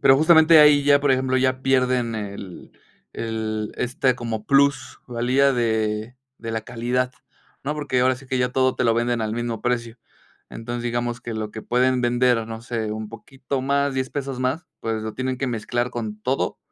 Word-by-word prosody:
pero 135 - +6
justamente 160 +1 +6
ahí 150 -1 +7
ya, 145 0 +5
por 145 -1 +2
ejemplo, 130 0 +2
ya 130 0 +1
pierden 125 -3 +1
el 100 -3 -7 0.4
el, 110 -1 -3
este, 130 +1 +1
como 115 -3 -5
plus 140 0 +2
valía 125 +3 +2
de 110 -1 -1 0.2
de 115 - -6
la 110 - -1
calidad, 125 +2 -2 0.5
¿no? 150 +2 -1
Porque 145 -4 -1
ahora 130 +1 +3
sí 135 - -15
que 130 0 -1
ya 125 0 +2
todo 130 0 +2
te 125 - -1
lo 115 -1 +3
venden 120 0 0
al 110 0 -2
mismo 120 -1 -3
precio. 120 -1 -2 0.5
Entonces, 120 +1 -6
digamos, 120 0 -2
que 120 -2 -6
lo 110 -1 -4
que 110 - -7
pueden 125 +1 +2
vender, 120 -1 +2
no 115 0 -7
sé, 115 -3 -3
un 110 0 -5
poquito 130 +4 -6
más, 140 +1 0
$10 130 0 -1
pesos 135 -2 -4
más, 130 +7 -1
pues 110 -1 -2
lo 110 0 -4
tienen 130 0 -2
que 135 - -1
mezclar 120 +1 -2
con 110 -3 -5
todo, 130 +3 -1
125 Hz, 190 wpm, -23 LUFS, 115-130 Hz, 0.5 s, ahí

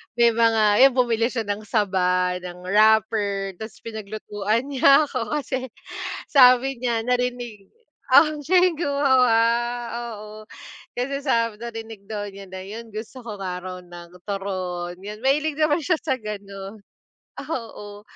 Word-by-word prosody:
may 235 -1 +5
mga 225 0 +4
yun, 265 - -3
bumili 230 -3 +2
siya 245 -3 -2
ng 205 +1 -4
saba, 180 -4 +1
ng 180 0 -9
wrapper, 205 -1 +2
ta's 220 0 -8
pinaglutuan 215 0 -3
niya 275 +2 +6
ako. 255 +2 -3
Kasi 260 -1 -4 0.6
sabi 255 -1 +6
niya, 235 -2 -1
narinig, 245 -4 -2 0.4
ah, 280 +5 +8 0.2
siya 360 +6 +2
yung 335 -4 0
gumawa. 260 -6 +3 0.8
Oo, 210 0 -10 0.7
kasi 275 +3 -2
sabi 230 -5 0
narinig 225 -3 -7
daw 205 -1 -3
niya 195 -1 -11
na 190 0 -7
yun 225 +3 -8
gusto 220 +4 -8
ko 220 -3 -7
nga 180 -2 -4
raw 185 0 -6
ng 175 -1 -12 0.2
turon. 185 -3 -4
Yun, 210 +2 -8
mahilig 295 +3 +1
naman 305 0 +3
siya 340 +2 +1
sa 265 -5 -1
ganon. 200 -1 -8 0.6
Oo, 210 -7 -6
220 Hz, 140 wpm, -23 LUFS, 200-250 Hz, 0.8 s, ah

